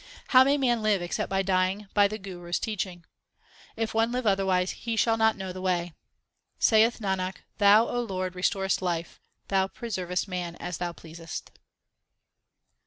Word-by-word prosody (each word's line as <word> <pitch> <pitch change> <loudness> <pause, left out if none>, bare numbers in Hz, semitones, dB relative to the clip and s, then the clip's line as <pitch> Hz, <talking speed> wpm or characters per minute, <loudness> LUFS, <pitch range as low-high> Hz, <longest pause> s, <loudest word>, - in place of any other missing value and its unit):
How 255 0 +8
may 280 +2 +3
man 240 -4 +1
live 215 -2 +2
except 175 0 -3
by 195 0 +1
dying 190 +2 0
by 205 -1 +5
the 215 +2 -5
Guru 180 -4 -9
s 175 - +1
teaching? 185 -6 -4 0.7
If 225 0 -2
one 225 +1 +2
live 250 0 -2
otherwise, 190 -2 +2
he 230 -1 -4
shall 225 0 +3
not 220 0 +2
know 190 -1 -5
the 185 - -7
way. 175 -2 -1 0.6
Saith 225 +1 +4
Nanak, 190 -2 -2 0.2
Thou, 210 +2 +6
O 245 - -1
Lord, 185 -5 -3
restorest 190 +1 0
life; 170 -2 -3 0.3
Thou 190 -1 +2
pre 235 +4 -8
servest 180 -1 -2
man 180 -2 -4
as 175 0 -6
Thou 175 -1 -2
pleasest. 165 0 -9
190 Hz, 170 wpm, -27 LUFS, 180-220 Hz, 0.7 s, How